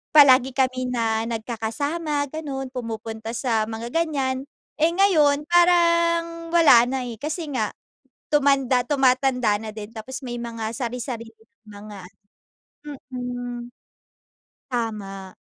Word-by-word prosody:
Palagi 265 -3 +7
kami 255 -1 0
na 225 -2 0
nagkakasama 285 +7 -2
ganon, 275 -4 -5
pumupunta 225 -2 -5
sa 230 -3 0
mga 225 +1 -5
ganyan. 275 -5 -1 0.3
Eh 320 +2 +4
ngayon, 310 -7 +4
parang 335 -1 +3
wala 295 -9 +7
na 260 -1 -2
eh, 230 - -7
kasi 310 +3 -4
nga 220 -5 -1 0.6
tumanda 270 -3 +3
tumatanda 255 -5 +2
na 220 -1 -6
din. 210 -1 -8
Tapos 260 +5 -7
may 240 -1 -4
mga 230 -2 -4
sari-sariling 235 -2 -5 0.3
mga 205 0 -10 0.7
ano 295 0 -12 0.2
mhm. 245 -1 -5 1.0
Tama. 200 -5 -4
255 Hz, 115 wpm, -23 LUFS, 225-295 Hz, 1.0 s, Palagi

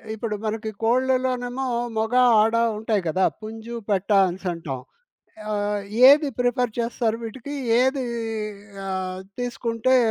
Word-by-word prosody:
ఇప్పుడు 220 -1 -3
మనకి 220 0 -3
కోళ్ళలోనేమో 255 +1 +1 0.3
మొగ, 220 +2 -1 0.3
ఆడ 225 +2 +2 0.2
ఉంటాయి 215 -2 0
కదా! 185 +4 +2 0.2
పుంజు, 225 +2 -7
పెట్ట 200 0 0 0.2
అనేసంటాం. 170 -7 -4 0.7
ఆహ్, 205 0 -1 0.3
ఏది 290 +1 +6
ప్రిఫర్ 245 -2 0
చేస్తారు 230 -1 -1
వీటికి? 255 +5 -7 0.3
ఏది 265 +1 +1 0.8
ఆహ్, 185 -1 -3 0.2
తీసుకుంటే 240 +1 +1
225 Hz, 105 wpm, -24 LUFS, 205-245 Hz, 0.8 s, ఏది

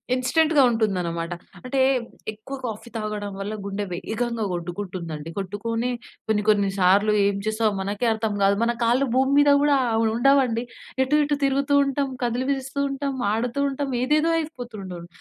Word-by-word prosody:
ఇన్‌స్టంట్‌గా 300 +4 +3
ఉంటుందన్నమాట. 180 -7 -1 0.3
అంటే 260 +1 0 0.5
ఎక్కువ 220 +6 -8
కాఫీ 225 0 -6
తాగడం 210 -2 -4
వల్ల 200 +2 -4
గుండె 200 +1 -3
వేగంగా 225 +4 -2
గొట్టుకుంటుందండి. 175 -3 -5
కొట్టుకొని 225 +5 -2 0.4
కొన్ని, 210 -1 +2
కొన్ని 200 -2 +3
సార్లు 200 +4 +4
ఏం 200 0 +1
చేసాం 215 0 +1
మనకే 205 +5 -1
అర్థం 220 -1 -2
కాదు. 200 +1 +4
మన 235 +1 +2
కాళ్ళు 245 +4 +3
భూమి 265 +1 +3
మీద 290 0 +6
గూడా 290 0 +4 0.2
ఆహ్, 225 0 +2
ఉండవండి. 245 -2 +3 0.4
ఎటు, 265 +3 +1
ఎటు 290 0 0
తిరుగుతూ 275 +1 +1
ఉంటాం, 275 0 -1
కదిలిపిస్తూ 260 +3 -1
ఉంటాం, 275 0 -2 0.2
ఆడుతూ 240 +4 -1
ఉంటాం, 275 0 -3
ఏదేదో 305 +5 +2
అయిపోతుండును 215 - -7
230 Hz, 140 wpm, -24 LUFS, 205-270 Hz, 0.5 s, మీద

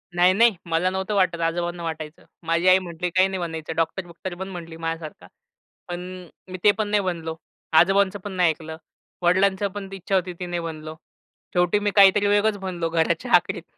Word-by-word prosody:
नाही-नाही. 190 +5 +5
मला 170 +2 +1
नव्हतं 190 +2 -3
वाटत, 185 -3 +2
आजोबांना 170 +1 -2
वाटायचं. 155 -1 -6 0.2
माझी 170 +2 +1
आई 185 +1 +7
म्हटली, 175 -1 -4
"काही 185 +2 +3
नाही 190 -1 -4
बनायचं. 160 -2 -5
डॉक्टर-बुक्टर 175 +2 -3
बन" 190 +2 -6
म्हटली 165 -3 -8
माझ्यासारखा. 165 -1 -6 0.6
पण 175 0 -4 0.5
मी 185 - -5
ते 205 - +7
पण 215 -1 -1
नाही 205 0 +2
बनलो. 165 -3 -3 0.4
आजोबांचं 195 +2 +3
पण 205 - -6
नाही 180 -3 +3
ऐकलं. 160 0 -5 0.4
वडिलांची 190 +3 +2
पण 195 -1 -6
इच्छा 195 +1 -2
होती, 180 -1 0
ती 180 +1 -6
नाही 175 -1 -3
बनलो. 155 -1 -7 0.6
शेवटी 180 +3 +2
मी 205 0 0
काहीतरी 200 +1 +6
वेगळंच 205 +1 +2
बनलो 175 -4 -3
घराच्या 165 -1 0
आखरीत. - - +1
180 Hz, 175 wpm, -23 LUFS, 165-190 Hz, 0.6 s, आई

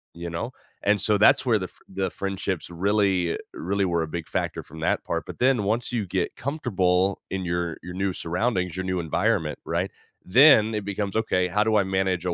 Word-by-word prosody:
You 85 0 -6
know? 85 +9 -4 0.3
And 105 0 +3
so 105 +1 +3
that's 105 - +5
where 115 -4 +3
the 90 - -4
fr - - -24
the 95 -1 -2
friendships 95 -2 -3
really 95 -1 +1 0.2
really 100 +2 -1
were 85 -2 0
a - - -4
big 85 +1 -5
factor - - -2
from 80 +2 -12
that - - 0
part, - - -3
but - - -9
then 125 -4 +3
once 115 +5 0
you 115 -5 -1
get - - -2
comfortable 95 - 0
in 95 -1 -3
your 85 -1 -2
your 90 - -7
new 95 0 -1
surroundings, 90 0 -1
your 95 0 -3
new 95 -1 -1
environment, 80 -3 0
right, - - -1 0.3
then 115 0 +6
it 105 - -2
becomes, 100 -1 -3
"Okay, 90 -5 +1
how 105 +4 +2
do 110 0 +1
I 100 - +4
manage 95 -2 0
a 90 - 0
95 Hz, 210 wpm, -25 LUFS, 90-105 Hz, 0.3 s, then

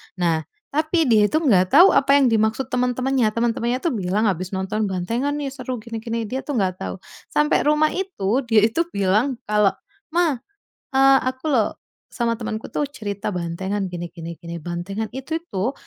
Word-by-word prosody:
Nah, 165 -4 +1 0.3
tapi 315 +3 +1
dia 215 -3 +5
itu 315 - +3
nggak 195 - +3
tahu 345 +7 +9
apa 275 0 +4
yang 270 - +4
dimaksud 220 +4 +1
teman-temannya. 250 0 +1
Teman-temannya 235 +2 0
tuh 335 - +1
bilang, 195 +1 0
"Habis 185 -1 -2
nonton 210 +3 -1
bantengan 230 +10 -1
nih, 285 -2 -3
seru, 255 -2 -5
gini 230 -1 -5
gini," 230 0 -2
dia 260 +5 -3
tuh 290 - -4
nggak 185 -2 0
tahu. - - -4 0.4
Sampai 300 0 +2
rumah 300 +1 +3
itu, 275 - -1
dia 220 -3 +4
itu 225 +10 +2
bilang 205 +7 +2
kalau, 210 -2 +3 0.4
"Mah, 330 -7 +2 0.5
eee, 270 0 +6
aku 260 +2 -6
loh 220 -5 +3 0.4
sama 230 -1 0
temanku 220 -1 -5
tuh 295 - -1
cerita 210 -8 -4
bantengan 190 +3 -3
gini 175 -1 -6
gini 170 0 -7
gini, 170 0 -8
bantengan 175 +6 -4
itu 315 +5 -3
tuh, 200 +7 -1
225 Hz, 175 wpm, -22 LUFS, 195-270 Hz, 0.5 s, tahu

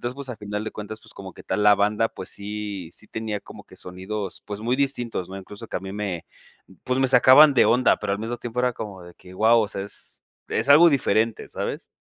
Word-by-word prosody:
entonces 120 +1 -4
pues 140 -2 -7
a 115 - -6
final 105 0 -4
de 110 - -4
cuentas 110 +1 -7
pues - - -13
como 95 -1 -10
que - - -12
tal 105 - -1
la 105 0 +7
banda 105 +3 +1
pues 95 - -7
sí 100 -3 -5
sí 110 - -12
tenía 110 -2 -4
como - - -13
que - - -17
sonidos 95 +2 -5
pues 105 0 -6
muy 125 +3 +1
distintos, 120 -9 -1
¿no? 95 - -7
incluso 100 +1 -10
que - - -3
a - - -3
mí 95 0 -7
me 100 -5 -4 0.6
pues 130 +1 0
me 135 - +3
sacaban 130 +4 +7
de 130 - +5
onda 125 +2 +4
pero 100 - -1
al - - -6
mismo 115 +2 -4
tiempo 120 0 -4
era 125 0 +1
como 100 -5 -8
de 90 0 -12
que, 90 0 -15
guau, 115 +3 +5
o 105 - -1
sea 95 - -4
es 100 - -2 0.3
es - - -2
algo 165 +4 +9
diferente, 115 -5 +1
¿sabes? - - -5
105 Hz, 245 wpm, -24 LUFS, 100-120 Hz, 0.6 s, algo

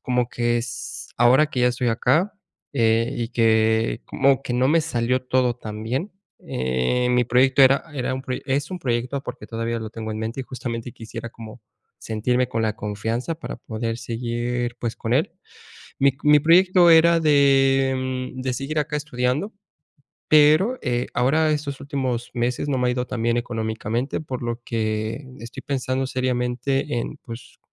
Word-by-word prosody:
como 125 -1 0
que 120 0 0
es 120 0 -6
ahora 125 +5 +5
que 125 - -2
ya 125 - +4
estoy 125 0 -1
acá, 160 - +2 0.4
eh, 115 -1 +2
y 115 -1 -2
que 110 -1 +2
como 135 -1 +2
que 125 - -4
no 125 +2 +2
me 165 +3 +4
salió 125 -4 0
todo 125 -1 +1
tan 110 -2 -7
bien, 130 - -3 0.3
eh, 65 - 0
mi 125 0 +3
proyecto 130 +3 +3
era 135 +2 +5
era 130 -1 -2
un 130 - -5
proyec 130 -2 -5
es 140 +4 -1
un 185 - -4
proyecto 125 0 -2
porque - - -8
todavía 115 0 -3
lo 110 -1 -6
tengo 110 0 -6
en 110 - -5
mente 115 +4 -4
y - - -6
justamente 120 -2 -5
quisiera 115 +1 -8
como 115 +1 -11 0.4
sentirme 125 +3 0
con 115 -2 -1
la 110 -1 -1
confianza 115 +8 -3
para 165 - -7
poder 115 +1 -4
seguir, 120 +1 -3
pues, 120 -2 -3
con - - -3
él. - - +1 0.7
Mi 135 -1 +4
mi 150 0 +6
proyecto 175 +3 +5
era 165 +1 +6
de, 135 -3 +4 0.4
mm, 130 - -4
de 130 - -1
seguir 140 +4 -4
acá 150 0 -1
estudiando, 145 - -2 0.8
pero, 155 +11 +5
eh, 120 -2 -1
ahora 155 +6 +2
estos 145 -2 -3
últimos 130 -4 -3
meses 120 +4 -1
no 140 - +1
me 125 0 +1
ha - - +2
ido 125 0 -2
tan 120 - -4
bien 115 0 +2
económicamente, 115 +2 -2
por 130 -5 -6
lo 120 0 -3
que 110 +2 -2 0.2
estoy 115 +1 -9
pensando 130 -1 -1
seriamente 130 +1 -1
en, 140 +5 -5
pues, 115 0 -11
125 Hz, 175 wpm, -23 LUFS, 115-135 Hz, 0.8 s, mi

